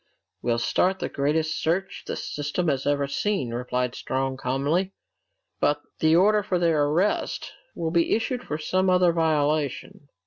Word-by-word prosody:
"We'll 120 -1 +1
start 185 +10 +1
the - - -3
greatest 155 +2 0
search 180 +4 -1
the - - -3
system 150 +4 -2
has 135 -1 -1
ever 145 -1 +2
seen," 140 - -1
replied 125 0 -2
Strong 130 0 -2
calmly. 145 +9 0 0.7
"But 145 0 +2 0.2
the 160 0 +4
order 210 +4 +4
for 190 -3 -1
their 165 -4 +2
arrest 170 +8 0 0.2
will 165 -1 -2
be 170 0 +3
issued 245 +3 -2
for 150 - -4
some 185 +4 +1
other 180 -2 +4
violation." 150 -3 0
155 Hz, 150 wpm, -25 LUFS, 140-180 Hz, 0.7 s, the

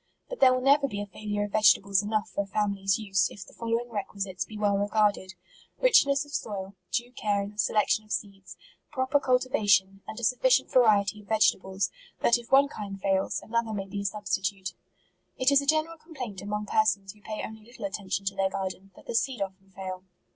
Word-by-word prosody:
But - - -6
there 260 - +7
will 255 0 +1
never 280 +1 +5
be 205 -5 -5
a 205 - -3
failure 205 0 -3
of 205 - -5
vegetables 200 -2 +4
enough 210 0 -1
for - - -1
a - - -13
family's 195 -1 0
use, 195 -3 +1
if 200 - -10
the - - -17
following 230 +1 -2
requisites 195 -3 -4
be 215 - -10
well 205 -1 +2
regarded: 205 -2 +1 0.2
— - - -29
Richness 285 - +4
of 290 - -15
soil; 195 -7 -4 0.2
due 240 +1 -1
care 205 -4 -1
in 200 - -7
the 210 - -16
selection 210 +2 +2
of 215 - -17
seeds; 195 -2 -5 0.3
proper 260 0 +1
cultivation; 215 -8 +2
and 220 - -7
a - - -9
sufficient 255 - +3
variety 210 -4 +4
of 200 - -20
vegetables, 195 -3 +1 0.3
that 235 - +4
if 235 - -14
one 275 +1 +6
kind 200 -7 -7
fails, 195 0 0
another 230 0 -1
may 195 -2 -3
be 200 +1 -5
a - - -6
substitute. 195 -2 -2 0.3
" - - -44
It 260 +2 +3
is 280 0 +5
a 280 - -7
general 315 +2 +1
complaint 250 - -7
among 210 +1 -3
persons 205 -3 +1
who 210 - -23
pay 215 +1 -5
only 220 0 -10
little 235 -1 -9
attention 200 0 -3
to 195 0 -1
their 195 0 +1
garden, 190 0 -5
that - - -16
the - - -5
seed 250 +1 0
often 195 0 -5
fail. 185 -1 -7
210 Hz, 210 wpm, -28 LUFS, 195-235 Hz, 0.3 s, there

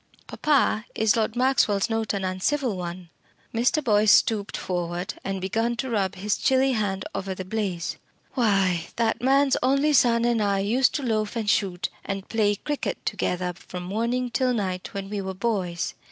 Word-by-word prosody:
"Papa, 270 -7 +1
is 220 -1 +3
Lord 220 0 0
Maxwell's 245 -6 +2
note 225 -1 -1
an 195 -1 -2
uncivil 215 +6 0
one?" 175 -1 -6 0.4
Mr. 245 +6 +2
Boyce 215 -3 +3
stooped 210 -3 +3
forward 175 0 -3
and 195 0 -3
began 225 +6 -1
to 255 +2 -3
rub 195 -4 0
his 200 +2 -1
chilly 265 0 +3
hand 200 -5 -1
over 195 -1 -3
the 185 - -6
blaze. 185 -4 -3 0.4
"Why, 195 - +2
that 230 0 0
man's 275 +2 +3
only 275 +4 +3
son 235 -3 +4
and 235 -2 +2
I 200 -1 +1
used 235 +7 +2
to 290 - -2
loaf 215 -3 -1
and 225 -2 -2
shoot 190 -4 +1
and 195 0 -4
play 210 -2 +2
cricket 295 +7 -4
together 180 0 -1
from 180 0 -8
morning 235 +6 -1
till 255 0 +1
night 185 -4 -3
when 195 -1 -4
we 205 0 -3
were 190 0 -5
boys. 185 -5 -2
210 Hz, 170 wpm, -25 LUFS, 190-240 Hz, 0.4 s, son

